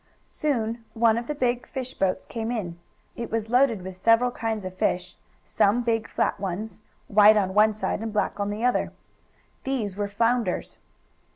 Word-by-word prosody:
Soon 230 -6 -2
one 225 -1 +4
of 235 +1 -3
the 300 - -3
big 245 -2 -1
fish 260 -1 -5
boats 190 -5 -1
came 225 -1 -4
in. 175 -8 -4 0.4
It 235 -1 -5
was 225 0 -3
loaded 245 -6 +3
with 185 0 -8
several 230 +5 +4
kinds 225 -4 -3
of 185 0 -6
fish, 180 -1 -1 0.3
some 225 +5 +2
big 225 -1 0
flat - - -1
ones, 200 +3 -5 0.3
white 210 +1 +6
on 190 -2 +1
one 215 +1 +4
side, 215 - -2
and 225 +1 -4
black 210 -1 -1
on 200 0 -1
the 215 +3 -2
other. 250 - +1 0.7
These 235 -8 -2
were 205 0 -2
flounders. 230 -1 0
220 Hz, 175 wpm, -25 LUFS, 200-235 Hz, 0.7 s, white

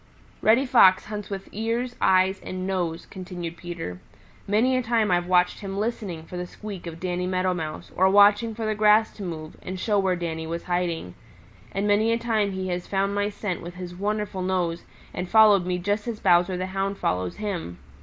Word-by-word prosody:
"Reddy 235 +5 +4
Fox 195 -8 +6
hunts 210 -1 -6
with 195 -1 -5
ears, 230 +3 -2
eyes 190 +1 +3
and 185 0 -5
nose," 175 -3 -2
continued 180 -3 -7
Peter. 170 - -6 0.5
"Many 225 +6 +3
a 255 - +2
time 225 -4 +1
I've 175 0 +1
watched 180 -1 +3
him 195 -1 -5
listening 205 -6 -3
for 180 +2 -8
the 180 0 -4
squeak 200 -2 -8
of 165 0 -7
Danny 180 0 -2
Meadow 185 0 +1
Mouse 160 -3 -5
or 190 +1 +4
watching 205 +3 +5
for 225 0 -4
the 215 - +1
grass 215 +1 +4
to - - -9
move 160 -3 -6
and 185 0 -6
show 205 +1 +1
where 190 -2 +1
Danny 160 -2 -4
was 170 +1 -4
hiding; 175 - -2 0.6
and 195 +1 -1
many 210 +2 +3
a 230 - +2
time 220 -4 0
he 190 0 -3
has 180 0 -3
found 195 0 0
my 205 0 0
scent 205 -3 -4
with 175 +1 -8
his 180 -1 -7
wonderful 205 0 -2
nose 180 -2 -1 0.3
and 180 0 -4
followed 210 -4 +6
me 180 -1 0
just 205 +5 -1
as 225 -3 -3
Bowser 180 0 +3
the 185 - -2
Hound 195 +1 -1
follows 90 - -1
him. 180 - -4
190 Hz, 200 wpm, -25 LUFS, 175-210 Hz, 0.6 s, Fox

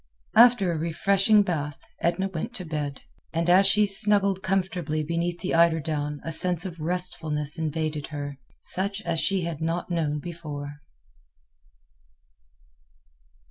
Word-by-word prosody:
After 230 -5 +6
a 165 - -3
refreshing 195 +6 +2
bath, 150 -6 -3 0.2
Edna 175 +3 0
went 195 +6 -6
to 185 - -5
bed. 150 -3 -5 0.3
And 165 +1 -1
as 190 +2 +6
she 210 +2 +4
snuggled 200 -1 +3
comfortably 180 -5 -1
beneath 170 +2 -3
the 190 - -3
eiderdown 155 -3 +1
a 165 - -4
sense 175 +2 +5
of 170 -3 -7
restfulness 160 -2 -2
invaded 155 -1 -3
her, 145 -2 -6 0.2
such 200 +3 0
as 170 -1 -1
she 195 +1 +1
had 165 -2 -5
not 165 +2 -2
known 155 -3 -1
before. 145 -3 -8
170 Hz, 130 wpm, -25 LUFS, 155-190 Hz, 0.3 s, After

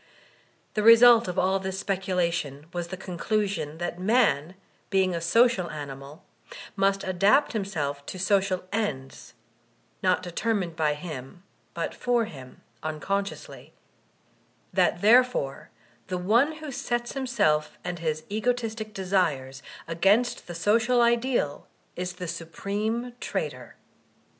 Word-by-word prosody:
The 215 - 0
result 230 +1 +8
of 180 - -4
all 190 +1 +2
this 190 0 -4
speculation 170 -7 -1
was 175 -1 -3
the 185 +1 -6
conclusion 190 -3 -2
that 175 +1 -4
man, 190 - +2 0.3
being 190 -2 +2
a 170 - -2
social 195 0 +3
animal, 145 +1 -8 0.5
must 195 0 +1
adapt 200 +11 +3
himself 155 -10 -3
to - - -6
social 190 0 +1
ends 140 -12 -4 0.7
(not 185 -1 +2
determined 180 -1 -2
by 155 -2 +1
him 150 0 -8 0.3
but 170 - -3
for 240 -2 +1
him 130 -9 -12
— - - -37
un 155 -1 -4
consciously); 200 +3 -4 1.0
that - - +2
therefore 235 - +3 0.4
the 185 - -2
one 230 - +3
who 310 -2 -8
sets 240 -1 -2
himself 205 - 0
and 175 -1 -4
his 155 -1 -2
egotistic 220 -1 -2
desires 165 -9 0 0.3
against 195 +9 +2
the 175 - -7
social 230 +8 +2
ideal 235 - +1 0.3
is 180 0 -4
the 180 0 -6
supreme 205 +9 -3
traitor. - - -4
190 Hz, 125 wpm, -26 LUFS, 165-225 Hz, 1.0 s, result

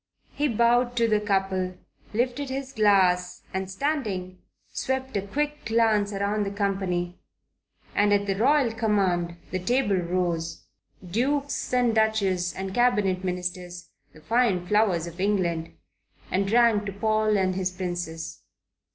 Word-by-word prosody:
He 295 - 0
bowed 240 +1 +2
to 230 -1 +3
the 215 -1 +3
couple, 190 -3 0 0.3
lifted 250 +5 -1
his 270 0 -4
glass, 185 -4 +3
and 190 0 -3
standing, 190 -7 -2 0.3
swept 265 -1 -3
a 200 - +1
quick 295 +9 -3
glance 220 -2 +2
round 200 +1 0
the 200 - -2
company, 190 -3 -2 0.7
and 205 0 +3
at 200 0 +3
the 195 - 0
royal 255 +4 +3
command 190 -6 0
the 185 - -1
table 205 0 +1
rose, 175 -2 -2 0.4
dukes 275 +9 -1
and 245 -2 +3
duchesses 200 -5 +1
and 190 0 -4
Cabinet 205 -6 +2
Ministers, 180 -1 -4 0.2
the 155 - -17
fine 225 -4 +1
flowers 195 -4 +2
of 170 +1 -9
England, 175 -5 0 0.6
and 195 +1 +1
drank 225 -1 +4
to 200 - -4
Paul 215 +1 +1
and 185 -1 +1
his 185 0 -1
Princess. 175 -3 -5
200 Hz, 135 wpm, -26 LUFS, 185-230 Hz, 0.7 s, drank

